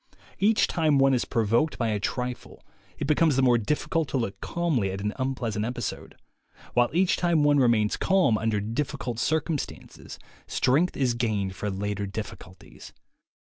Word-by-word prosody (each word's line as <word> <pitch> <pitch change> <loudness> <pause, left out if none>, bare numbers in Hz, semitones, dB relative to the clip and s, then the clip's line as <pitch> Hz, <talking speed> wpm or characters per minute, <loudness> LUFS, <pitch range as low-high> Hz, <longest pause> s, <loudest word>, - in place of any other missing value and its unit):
Each 215 +2 +4
time 155 -4 +1
one 135 0 +4
is 125 - +1
provoked 115 +7 +1
by 115 -2 0
a 105 -1 -1
trifle, 125 +3 -4 0.3
it - - -3
becomes 150 0 +3
the 135 - +2
more 120 -2 +4
difficult 150 +6 -1
to 135 - -1
look 100 -6 -3
calmly 155 - -1
at 95 +1 -4
an 105 +1 -2
unpleasant 120 -5 -2
episode; 120 +1 -5 0.6
while 120 0 +3
each 180 +3 +2
time 170 -4 +2
one 145 -1 +4
re 130 - +4
mains 110 -3 +2
calm 190 - +3
under 110 -1 0
difficult 120 +2 -3
circumstances, 155 +1 -3 0.3
strength 150 +8 +1
is 130 -3 +1
gained 105 -5 -1
for 105 - -3
later 100 +1 -3
difficulties. 95 -3 -9
125 Hz, 160 wpm, -26 LUFS, 105-150 Hz, 0.6 s, Each